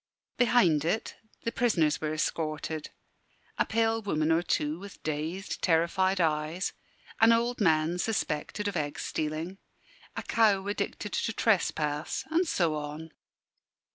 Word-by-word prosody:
Behind 205 - +4
it 175 +7 -1 0.3
the 230 - -1
prisoners 185 - +2
were 155 -1 -1
escorted 155 0 -2 0.7
a - - +2
pale 225 0 +1
woman 155 -6 0
or 165 +1 +4
two 155 -2 -1
with 200 0 -11
dazed, 155 +6 -3
terrified 185 +3 +2
eyes, 160 +2 0 0.5
an 225 +1 +7
old 235 +1 +1
man 160 -1 +3
suspected 205 0 -1
of 205 - -3
egg 145 -3 -2
stealing, 155 +5 -3 0.6
a - - -4
cow 205 -4 +3
addicted 205 0 -3
to 225 - 0
trespass, 155 -8 0
and 340 +2 +2
so 170 - +1
on. 150 +2 -5
170 Hz, 130 wpm, -29 LUFS, 155-210 Hz, 0.7 s, an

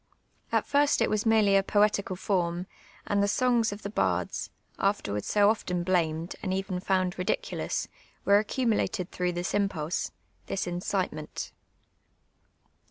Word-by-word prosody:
At - - +2
first 285 0 +3
it - - 0
\va« - - +3
niorely 205 -3 +5
a - - +2
jKH'tical 200 -2 +2
form, 175 -2 0 0.4
and 200 0 +1
the 200 - +3
son^ 235 +1 +2
of 205 +1 -8
tlic 200 - -5
bards, - - 0 0.3
aftrrwards 105 - 0
so 205 -1 +4
olttn 180 -5 0
blamed, 170 -2 0
and 190 - -2
even 190 -1 -2
fijuud 185 -1 0
ridi 180 - +2
culous, - - -3 0.4
wcro 200 +1 +6
accumulated 215 -5 0
through 180 0 -1
tliis 180 +4 0
imjiulM, 160 -1 -2 0.2
— - - -39
this 195 - -2
incite 180 +2 -1
ment. 155 0 -6
195 Hz, 150 wpm, -28 LUFS, 180-205 Hz, 0.4 s, wcro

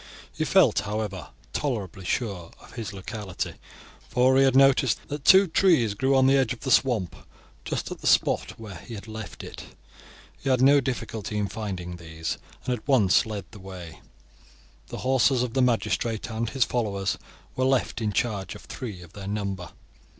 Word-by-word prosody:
He - - -1
felt, - - +5
however, 105 -4 -4 0.2
tolerably 100 - -3
sure 95 -6 -2
of - - -16
his 110 -4 -5
locality, 100 -1 -5 0.6
for 130 +1 +4
he 135 - +5
had 135 -1 +3
noticed 135 -2 +5
that 145 -1 -5
two 190 +1 +8
trees 165 - +3
grew 135 +6 +1
on 130 0 +5
the 135 +1 +5
edge 130 -3 +2
of 120 - -12
the 130 - -2
swamp 115 -11 +2 0.5
just - - -3
at - - -6
the - - -2
spot - - +2
where 105 -5 -8
he 115 +7 -9
had 100 +1 -9
left 110 -1 -8
it. - - -10 0.6
He 135 - -3
had 130 -2 +3
no 140 +2 +6
difficulty 110 -5 -4
in 100 -1 -1
finding 95 -5 -5
these, 80 -1 -5 0.3
and 125 - 0
at 120 +2 -6
once 110 -8 +4
led 105 -2 -5
the 105 - -12
way. 95 -3 -9 0.9
The - - -7
horses 130 -1 +3
of 120 -2 -3
the 130 - +2
magistrate 115 -2 0
and 110 +1 -2
his 130 +1 +2
followers 100 -5 -1 0.4
were 130 - +1
left 130 -3 +1
in 105 -2 0
charge 100 -3 -2
of - - -11
three 105 -8 -7
of 85 0 -15
their 100 -1 -8
number. 100 -3 -3
110 Hz, 180 wpm, -26 LUFS, 100-130 Hz, 0.9 s, two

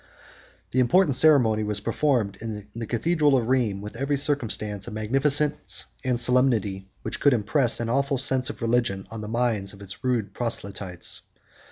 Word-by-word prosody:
The 130 - 0
important 145 +5 +3
ceremony 125 -7 +4
was 105 -1 -2
performed 115 -3 0
in 105 -2 -6
the 115 -1 -6
cathedral 145 +4 +2
of 115 -3 -2
Rheims, 115 -7 0
with 105 - -8
every 140 +4 -1
circumstance 115 -8 0
of 115 - -7
magnificence 135 +7 +1 0.2
and 125 -2 0
solemnity 115 -6 +1
that - - -5
could 145 -3 +4
impress 120 +3 +1
an 120 - -2
awful 140 +3 0
sense 130 -1 +2
of - - -7
religion 115 -5 0
on 115 -1 -6
the 105 - -6
minds 110 -4 -1
of 100 - -14
its 100 +2 -8
rude 120 -5 -1
proselytes. 100 -6 -2
120 Hz, 165 wpm, -25 LUFS, 105-135 Hz, 0.2 s, ceremony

